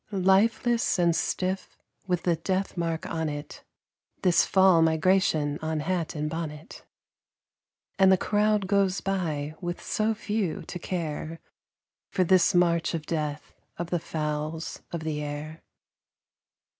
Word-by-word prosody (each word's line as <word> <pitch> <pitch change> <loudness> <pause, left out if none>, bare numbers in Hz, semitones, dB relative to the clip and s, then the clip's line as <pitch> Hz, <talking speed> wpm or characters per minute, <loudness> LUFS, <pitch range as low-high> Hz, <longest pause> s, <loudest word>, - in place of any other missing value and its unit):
Lifeless 215 +5 +2
and 170 -2 +3
stiff, 185 +2 -2 0.3
with 180 -2 0
the 175 -2 +2
death 185 +4 -2
mark 165 -2 -2
on 160 -1 -2
it, 145 0 -7 0.6
This 180 -3 +4
"Fall 190 -3 +5
Migration" 160 -2 +2
on 160 -1 -2
hat 170 0 -2
and 150 0 -2
bonnet. 155 -1 -6 1.2
And 190 0 +7
the 190 - +6
crowd 210 0 +1
goes 195 -1 +2
by, 160 -7 -2
with 175 -1 -3
so 220 +1 0
few 210 -5 -2
to 180 - -7
care 165 -2 -4 0.7
For 185 - +1
this 180 0 +4
march 170 -1 +3
of 155 -2 -5
death 150 -2 -3 0.2
of 175 0 -5
the 175 - +1
"fowls 155 0 -4
of 170 - -4
the 155 -1 -3
air." 150 +2 -6
170 Hz, 130 wpm, -27 LUFS, 155-190 Hz, 1.2 s, And